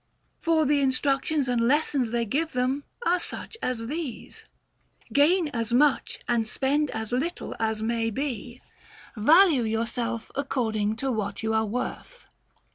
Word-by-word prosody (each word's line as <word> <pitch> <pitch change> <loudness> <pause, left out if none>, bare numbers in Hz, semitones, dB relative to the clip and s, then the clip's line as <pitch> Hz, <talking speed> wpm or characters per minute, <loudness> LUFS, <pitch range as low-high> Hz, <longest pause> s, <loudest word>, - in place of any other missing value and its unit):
For 325 -2 +2
the 290 +1 +3
instructions 270 +2 +1
and 245 -1 +1
lessons 270 0 +2
they 235 0 0
give 310 +8 -1
them 255 +3 0 0.2
are 355 +1 +3
such 440 - -7
as 235 -3 -2
these: 295 -1 -6 0.7
Gain 315 +4 +4
as 230 -4 -3
much 285 +2 +2
and 230 -2 +1
spend 285 +5 0
as 220 0 -4
little 280 +8 -2
as 220 -1 -1
may 225 0 0
be; 245 0 -4 0.5
value 310 - +6
yourself 230 +1 -2
according 220 -6 -1
to 265 +3 -2
what 215 -2 -3
you 220 0 0
are 220 0 +1
worth. 250 - -5
250 Hz, 140 wpm, -26 LUFS, 225-290 Hz, 0.7 s, value